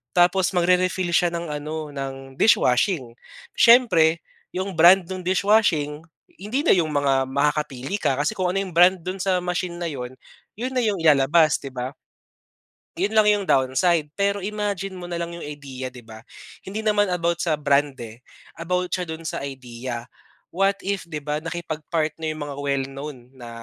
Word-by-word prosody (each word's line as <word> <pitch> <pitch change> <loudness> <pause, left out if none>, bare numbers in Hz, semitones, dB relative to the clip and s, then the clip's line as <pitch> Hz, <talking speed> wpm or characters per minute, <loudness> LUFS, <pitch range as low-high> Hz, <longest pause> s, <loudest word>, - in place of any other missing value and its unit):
tapos 180 +1 +3
magre-refill 180 0 +2
siya 175 +1 +3
ng 170 -1 -4
ano 150 +1 -5
ng 135 -1 -7
dishwashing. 125 - +2 0.4
Siyempre 180 -10 +5 0.3
yung 190 -1 -4
brand 175 +4 +7
nung 185 -1 -6
dishwashing 180 -6 +2 0.3
hindi 215 - -2
na - - +3
yung 160 -3 0
mga 135 -2 +2
makakapili 140 +3 -1
ka 170 - +1
kasi 180 +9 -2
kung 180 -1 0
ano 195 - 0
yung 190 - -5
brand 180 +1 +6
dun 185 +3 -5
sa 185 -1 0
machine 180 0 -3
na 170 - -2
yun, 125 -4 -6 0.4
yun 250 +4 -4
na 260 - 0
yung 200 -5 0
ilalabas 155 +1 +4
'di 135 -2 -9
ba? 125 0 -3 1.1
Yun 205 +4 0
lang 215 - +6
yung 205 -1 0
downside. 145 +4 +2
Pero 200 0 0
imagine 205 -1 -3
mo 175 - -7
na 175 - -4
lang 170 0 -4
yung 170 0 -8
idea 140 -3 -7
'di 125 -1 -11
ba, 110 -1 -12 0.5
hindi 210 +3 -4
naman 210 -1 +2
about 170 -1 0
sa 160 -3 +1
brand, 145 -1 +1
eh, 115 0 -10 0.4
about 180 +1 -2
siya 180 -1 -2
dun 160 0 -7
sa - - -4
idea. 125 -3 -6 0.5
What 195 +2 +2
if 195 -3 -3
'di 150 -3 -6
ba, 150 0 -2
nakipag-partner 160 -1 -3
'no - - 0
yung 155 -1 -5
mga 145 -1 -6
well-known 140 0 -3 0.2
na 120 -1 -9
165 Hz, 175 wpm, -23 LUFS, 140-185 Hz, 1.1 s, brand